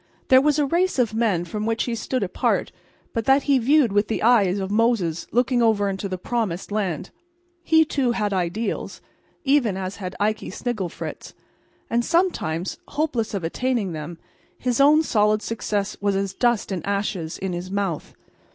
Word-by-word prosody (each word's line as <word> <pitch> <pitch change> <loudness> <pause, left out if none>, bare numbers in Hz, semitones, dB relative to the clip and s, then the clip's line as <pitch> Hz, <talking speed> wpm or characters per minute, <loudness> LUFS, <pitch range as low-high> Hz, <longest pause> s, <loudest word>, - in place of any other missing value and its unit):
There 260 0 +7
was 295 +1 +2
a 295 - +3
race 350 +5 +1
of 235 -4 +1
men 215 -7 +1
from 210 +5 -4
which 225 0 0
he 240 - -2
stood 230 +1 -2
apart 185 - 0 0.4
but 230 -2 -2
that 270 +1 +4
he 275 -2 +3
viewed 270 -1 +4
with 205 +1 +2
the 220 - -2
eye 230 -3 +5
of 190 +1 -2
Moses 210 -7 +1
looking 245 +1 +2
over 220 -3 +3
into 195 +1 -4
the 185 - -3
promised 200 -3 -3
land. 190 -5 -2 0.5
He, 320 -1 +4
too, 265 -5 0
had 210 -3 -1
ideals, 185 +5 -2 0.4
even 265 -8 +2
as 190 +1 -4
had 185 -2 -6
Ikey 215 +1 0
Snigglefritz; 215 -8 -5 0.5
and 235 +1 +1
sometimes, 200 - 0
hopeless 265 -8 -1
of 190 - -3
attaining 225 +3 -1
them, 160 +1 -6 0.4
his 250 +1 0
own 300 +3 +6
solid 210 -5 +2
success 210 -3 -2
was 200 -1 +1
as 195 0 -1
dust 240 -2 +1
and 185 -3 -3
ashes 195 -5 -2
in 190 -1 -3
his 175 +1 -5
mouth. 195 -5 -3
215 Hz, 170 wpm, -23 LUFS, 190-245 Hz, 0.5 s, There